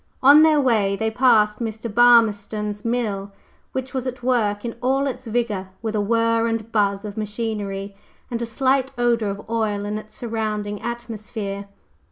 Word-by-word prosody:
On 285 +3 +9
their 310 -1 +5
way 215 -7 +2
they 220 +2 -1
passed 220 -3 +3
Mr. 225 -1 -4
Burmistone's 210 -2 +3
mill, 215 -5 -2 0.4
which 260 -1 -4
was 260 -1 -2
at 255 -1 -6
work 220 -4 +1
in 230 - -4
all 265 +2 +1
its 260 -2 -4
vigor, 215 -5 -1
with 220 -1 -2
a 210 - +1
whir 230 +2 +2
and 225 -1 -3
buzz 200 -1 +1
of 205 0 -7
machinery, 205 -2 -4 0.4
and 235 -1 -2
a 235 - -2
slight 265 +3 +1
odor 235 -3 +1
of 200 +1 -6
oil 215 -3 -1
in 210 +1 -2
its 215 0 -14
surrounding 215 -3 -3
atmosphere. 215 -4 -5
225 Hz, 165 wpm, -22 LUFS, 205-240 Hz, 0.4 s, On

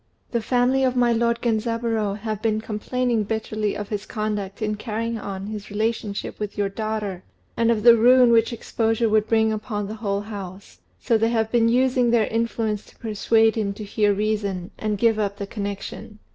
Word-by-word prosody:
The 235 - 0
family 250 +3 +2
of 255 -1 +1
my 240 -1 +3
lord 235 0 0
Genzaburô 225 -2 0
have 215 -1 -4
been 215 -1 +1
complaining 230 +2 -1
bitterly 215 0 -2
of 205 -1 -6
his 205 -1 -4
conduct 210 -3 -3
in 215 -1 -1
carrying 225 +1 -3
on 195 -1 -5
his 210 -1 -6
relationship 215 -1 -2
with 210 -1 -5
your 200 -1 0
daughter, 210 -3 -4 0.3
and 230 0 +2
of 220 -3 +1
the 235 -1 +9
ruin 245 +1 +6
which 230 0 +4
exposure 225 0 0
would 215 0 +2
bring 220 -1 +3
upon 210 -2 -3
the 210 - -5
whole 200 -2 -1
house; 195 - -9 0.2
so 230 -2 +1
they 225 +1 +2
have 225 -2 0
been 230 -1 +3
using 250 0 +3
their 230 -2 +3
influence 225 -2 -1
to - - -20
persuade 225 0 +2
him 205 -3 -1
to 210 - -8
hear 210 0 +1
reason, 200 -2 -1
and 215 -1 -1
give 225 0 +2
up 200 -1 -1
the 200 - -4
connection. 205 +1 -6
220 Hz, 185 wpm, -23 LUFS, 205-230 Hz, 0.3 s, the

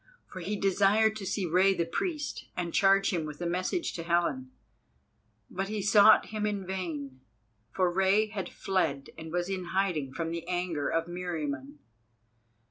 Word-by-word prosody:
For 185 - -9
he 190 +4 -3
desired 205 +3 +3
to 195 -3 -6
see 195 0 -1
Rei 185 +3 +3
the 170 - 0
Priest, 300 - -3
and 175 -2 -3
charge 195 0 +4
him 170 -3 0
with 150 -1 -7
a 175 - -3
message 185 - -1
to 170 - -5
Helen. 165 -6 0 1.0
But 195 +1 -3
he 210 -1 -3
sought 205 +1 +6
him 210 -1 -1
in 200 -2 -3
vain, 155 -8 -5 0.5
for 185 +7 +1
Rei 195 +3 +3
had 205 -3 -4
fled, 160 -8 -1
and 160 0 -9
was 175 +1 -1
in 190 -2 -3
hiding 165 -9 0
from 165 +4 -3
the 170 0 -5
anger 175 -5 -1
of 165 0 0
Meriamun. 150 -6 -4
180 Hz, 165 wpm, -29 LUFS, 165-195 Hz, 1.0 s, sought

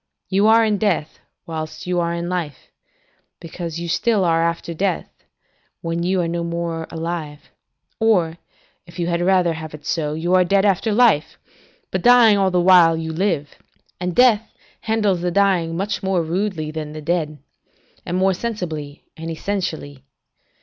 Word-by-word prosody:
You 200 +2 +3
are 225 +1 +6
in 210 -2 0
death, 175 -8 -1 0.3
whilst 155 -1 -6
you 180 0 0
are 170 0 0
in 170 0 -3
life, 170 -6 -5 0.7
because 170 -1 -6
you 170 - -5
still 190 +3 +1
are 165 -1 +2
after 170 0 -2
death, 185 +1 -1 0.7
when 165 0 -2
you 185 +1 +1
are 170 - -1
no 170 0 -2
more 170 -1 -3
alive; 160 -3 -6 0.5
or, 180 -7 +2 0.5
if 170 +1 -14
you 175 - -1
had 170 0 -1
rather 180 -2 +3
have 155 -1 -7
it 150 - -14
so, 150 -2 -1
you 170 +3 -1
are 185 0 +6
dead 195 +3 +2
after 200 +2 +1
life, 210 -8 +3 0.5
but - - -1
dying 240 -3 +6
all 190 -1 +3
the 180 -1 +1
while 175 -2 +6
you 160 0 -4
live; 165 -5 -1 0.5
and 180 -1 -3
death 230 -4 +4 0.3
handles 210 -5 0
the 180 - 0
dying 175 -3 +1
much 200 +3 -2
more 190 -3 0
rudely 170 -2 -2
than 155 -1 -6
the 155 - -7
dead, 155 -2 -1 0.7
and 175 - -3
more 190 +1 +3
sensibly 170 -9 -5
and 165 +1 -7
essentially. 160 -6 -4
175 Hz, 165 wpm, -21 LUFS, 165-195 Hz, 0.7 s, are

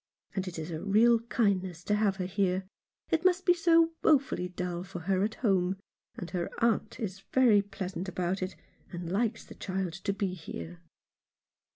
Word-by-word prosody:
And 190 -1 -2
it 175 - -5
is 160 +2 -5
a 160 -1 -4
real 225 +4 +5
kindness 190 -7 0
to 210 - 0
have 210 -2 +2
her 185 -2 -3
here. 190 0 0 0.5
It 330 +1 +2
must 370 0 +3
be 355 - +6
so 335 -1 +4
wofully 275 - +3
dull 180 -1 -3
for 185 -2 -7
her 190 +2 +1
at 215 +1 -1
home; 190 -4 +1 0.4
and 200 -8 -6
her 175 -2 -2
aunt 230 -1 +1
is 195 -4 -4
very 240 -6 +6
pleasant 195 -2 -5
about 185 +1 -1
it, 185 +1 -3 0.4
and 175 -2 -5
likes 225 +3 0
the - - -11
child 190 -3 -3
to 195 +2 -2
be 195 -2 -2
here." 85 - -7
195 Hz, 180 wpm, -30 LUFS, 180-225 Hz, 0.5 s, be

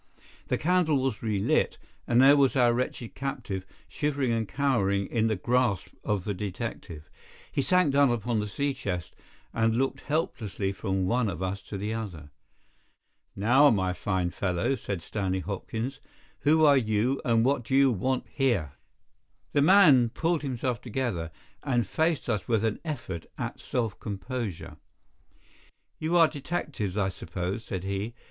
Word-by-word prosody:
The - - +1
candle 175 -3 +2
was 130 -5 -1
relit, 105 -3 +1 0.3
and 120 0 +3
there 140 +2 +8
was 140 -2 +3
our 120 -2 +4
wretched 120 -1 -3
captive, 100 -9 -4 0.2
shivering 145 -4 -1
and 115 -2 0
cowering 100 -8 +1
in 115 +1 0
the 110 - +1
grasp 115 - +1
of 105 -3 -1
the 105 - -2
detective. 90 -5 -6 0.4
He - - 0
sank 155 +1 +3
down 140 -1 +5
upon 120 -1 0
the 105 - -2
sea 140 +7 -1
chest, 90 -10 -4 0.4
and 115 0 +2
looked 135 +1 0
helplessly 115 - -2
from 95 -1 -1
one 115 +2 +1
of 90 -1 -4
us 95 +1 -3
to 100 - -5
the 105 +3 -3
other. 90 -10 -6 1.0
"Now, 130 +8 +5
my 95 -5 +1
fine 90 -2 -1
fellow," 90 +6 0
said 100 -9 -4
Stanley 95 -2 -2
Hopkins, 110 - -4 0.4
"who 155 +2 +4
are 145 -2 +6
you, 115 +3 +1
and 115 -1 +3
what 135 -2 +1
do 130 - -1
you 135 -1 +5
want 130 +5 -1
here?" 120 - 0 0.8
The 145 - +3
man 150 -8 +6
pulled 165 +6 0
himself 125 -3 -2
together, 115 -9 -2 0.3
and 120 -5 +1
faced 160 - 0
us 105 -6 -1
with 115 -2 +1
an 110 - -1
effort 120 - -5
at - - -4
self 115 -6 -2
composure. 105 -1 -5 1.2
"You 165 +3 +1
are 165 -1 +7
detectives, 140 - -4
I 100 -2 +1
suppose?" 95 +4 -4
said 95 -4 -5
he. 100 +4 -3
115 Hz, 155 wpm, -28 LUFS, 100-135 Hz, 1.2 s, there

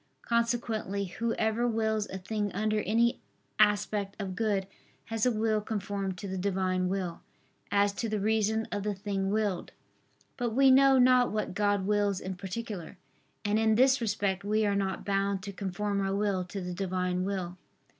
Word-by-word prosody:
Consequently 230 -4 0
whoever 230 +3 0
wills 220 -2 0
a 190 - -6
thing 205 +2 -2
under 215 +2 0
any 230 +4 +2 0.4
aspect 205 -1 +2
of 190 -2 -4
good, 200 -2 0 0.4
has 225 +1 0
a - - +3
will 215 -1 +1
conformed 200 -3 -3
to 200 - -6
the 190 0 -3
Divine 185 -1 0
will, 185 -3 -3 0.5
as 200 0 +3
to 225 +2 -3
the 215 -1 -1
reason 220 +1 +1
of 205 - -2
the 205 0 -2
thing 195 -1 -2
willed. 205 -3 -1 0.6
But 240 -3 -2
we 270 0 +6
know 270 0 +6
not 250 -1 +5
what 215 -3 -2
God 205 -1 +1
wills 205 -1 +1
in 190 - -5
particular: 195 -1 -6 0.5
and 210 +1 +2
in 220 -1 +3
this 260 +2 +4
respect 200 -3 -1
we 215 +1 +1
are 200 -1 +1
not 195 -1 -2
bound 195 -1 0
to 200 -1 -6
conform 200 +1 -2
our 195 0 0
will 200 -3 0
to 195 +2 -6
the 180 0 -4
Divine 180 -1 -1
will. 185 -2 -3
205 Hz, 170 wpm, -29 LUFS, 195-220 Hz, 0.6 s, we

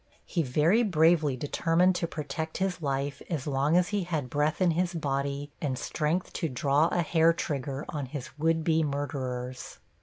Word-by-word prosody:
He 170 - -1
very 155 - +3
bravely 160 - +3
determined 165 +6 +2
to 170 - -1
protect 160 +1 -4
his 185 -2 -1
life 140 -1 -2
as 155 -6 -2
long 145 +3 +2
as 180 +1 +2
he 205 -1 0
had 155 -8 -3
breath 150 +2 +1
in 180 -2 +4
his 175 +2 0
body 140 -1 -2
and 135 -4 -1
strength 155 +7 -1
to 165 - -2
draw 140 +4 +2
a 175 0 0
hair 165 0 +4
trigger 140 -3 -3
on 145 -3 -4
his 130 -2 -7
would 165 +1 +2
be 160 0 +2
murderers. 130 -4 -4
150 Hz, 175 wpm, -28 LUFS, 140-165 Hz, -, in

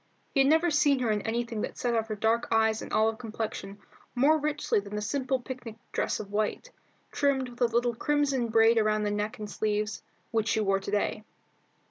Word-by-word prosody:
He 275 - +2
had 270 - +5
never 320 +2 +4
seen 290 -2 +4
her 245 -4 0
in 210 -1 0
anything 230 0 -2
that - - -5
set 240 -1 0
off 225 -1 0
her 215 - -3
dark 225 +3 +1
eyes 220 -1 +2
and - - -8
olive 220 +1 +2
complexion 215 -3 -5 0.4
more 295 +5 +4
richly 300 -6 0
than 200 +1 -7
the 210 - -2
simple 265 +2 -1
picnic 245 -3 -8 0.2
dress - - -1
of 200 -2 -7
white, 215 - -2 0.4
trimmed 270 -3 +1
with 245 +1 -14
a - - +6
little 235 +1 +1
crimson 275 -1 +1
braid 225 0 +5
about 215 0 +1
the 205 - 0
neck 210 +1 -2
and 210 - -6
sleeves, 210 0 -2 0.3
which 220 -2 0
she 220 - +1
wore 195 -2 +2
to 195 - -7
day. 210 +1 -1
225 Hz, 205 wpm, -28 LUFS, 215-260 Hz, 0.4 s, a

